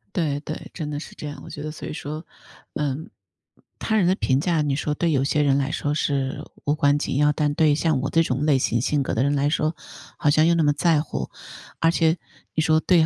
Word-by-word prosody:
对 150 -5 0
对， 155 +1 -7
真 155 -3 -4
的 145 - -3
是 - - -10
这 150 - -7
样。 145 - -7
我 - - -10
觉 145 - -7
得 155 - -4
所 155 - -8
以 - - -5
说 155 +2 -6 0.5
嗯， 150 +1 -2 0.7
他 220 -1 0
人 190 - +3
的 180 - +4
评 135 -9 +1
价， 165 0 +1
你 145 -2 0
说 150 +1 -1
对 165 +2 0
有 135 -2 +2
些 150 +2 +1
人 140 -2 +3
来 140 +1 0
说 145 - -1
是 140 -3 -1 0.2
无 145 - +2
关 145 -1 +3
紧 135 - -2
要， 150 +1 +4
但 150 0 +1
对 155 -2 +4
像 155 -2 +1
我 140 - -1
这 165 - +4
种 135 -1 0
类 140 -4 +4
型 120 -1 +1
性 145 +4 +1
格 135 - -2
的 115 - +2
人 145 +1 +2
来 140 +1 +2
说， 155 +1 0 0.4
好 145 - +2
像 155 +2 +4
又 170 - +4
那 170 - +2
么 145 - +4
在 155 +1 +2
乎。 65 - -5 0.5
而 165 - +4
且 165 0 +2 0.4
你 155 - +2
说 155 0 +4
得 - - -13
对。 170 -4 +5
150 Hz, 270 characters per minute, -24 LUFS, 140-160 Hz, 0.7 s, 对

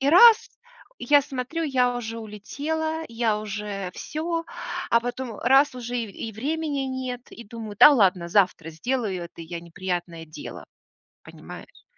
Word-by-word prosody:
И 270 - +2
раз 450 +6 +8 0.5
я 290 -1 +5
смотрю, 270 +5 -4
я 250 -4 +2
уже 230 -1 -5
улетела, 305 +10 -3
я 230 -2 0
уже 205 -3 -4
всё, 330 +2 -3 0.5
а 235 - +6
потом 245 -2 -5
раз 270 +2 +5
уже 245 0 -4
и 230 - -2 0.2
и - - -8
времени 290 +5 -2
нет, 255 -2 -4
и 235 - -10
думаю: 220 -1 -8
"Да 295 - +11
ладно, 185 -9 +3
завтра 180 -4 +2
сделаю 190 +1 -2
это 170 0 -10
я 170 +1 -6
неприятное 175 -1 -4
дело". 155 - -9 0.6
Понимаешь? - - -12
235 Hz, 145 wpm, -25 LUFS, 195-275 Hz, 0.6 s, Да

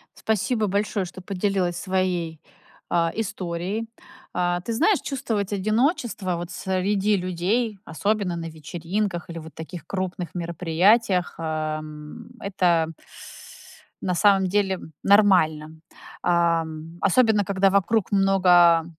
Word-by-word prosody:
Спасибо 220 +1 0
большое, 200 0 -1
что 185 +1 -10
поделилась 185 -2 -1
своей, 180 -4 -1 0.5
а 170 -1 +2
историей. 190 +1 -3 0.5
А, 175 0 0
ты 230 - -5
знаешь, 340 - +3
чувствовать 225 -8 -2
одиночество, 215 - 0
вот 175 +1 -6
среди 195 +2 0
людей, 195 +5 -1
особенно 200 +2 -1
на 165 - -5
вечеринках, 175 +5 -4
или 170 0 -6
вот 160 -2 -11
таких 160 0 -8
крупных 185 -1 -4
мероприятиях, 180 +4 +2
ам, 155 -1 -5
это 175 -5 +1 1.1
на 185 - 0
самом 195 0 +4
деле 190 -1 +1 0.2
нормально. 180 -7 +4 0.5
Ам, 165 -2 0
особенно, 215 +1 +4
когда 195 0 +2
вокруг 200 +2 +1
много 180 -4 +5
185 Hz, 105 wpm, -24 LUFS, 170-205 Hz, 1.1 s, много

